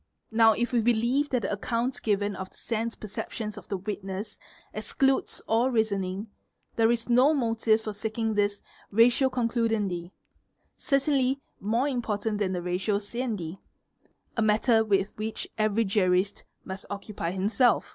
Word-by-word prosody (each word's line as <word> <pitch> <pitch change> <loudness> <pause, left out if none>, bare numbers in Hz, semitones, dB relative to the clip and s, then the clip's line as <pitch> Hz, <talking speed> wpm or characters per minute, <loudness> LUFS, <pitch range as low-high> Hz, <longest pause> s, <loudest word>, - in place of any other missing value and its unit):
Now 225 0 +6
if 240 +2 -1
we 235 - +4
believe 240 +5 +2
that 250 -4 0
the - - -1
account 235 +4 -1
given 205 -1 0
of 185 0 -6
the - - -21
sense 230 0 -2
perceptions 215 +1 -5
of 205 -4 -11
the 195 - -2
witness 195 +1 -5 0.3
excludes 265 +5 +1
all 230 +3 +2
reasoning 205 -3 -1 0.4
there 225 0 +4
is 230 -1 -1
no 255 +6 +5
motive 225 -3 +2
for 215 -1 -4
seeking 220 +1 -2
this 205 -1 0 0.3
"ratio 240 +5 +4
concludendi"', 225 -8 0 0.7
certainly 275 -2 +1 0.2
more 230 +7 +1
important 220 -5 -1
than 190 -3 0
the 175 -1 -3
"ratio 185 +4 0
sciendi'"', 205 -5 -4 0.8
a 230 - 0
matter 220 +1 +4
with 200 -2 +1
which 220 +1 -3
every 215 +1 +2
jurist 190 -1 +1 0.2
must 190 +1 -7
occupy 200 -3 -4
himself. 210 +6 +2
220 Hz, 145 wpm, -27 LUFS, 200-235 Hz, 0.8 s, Now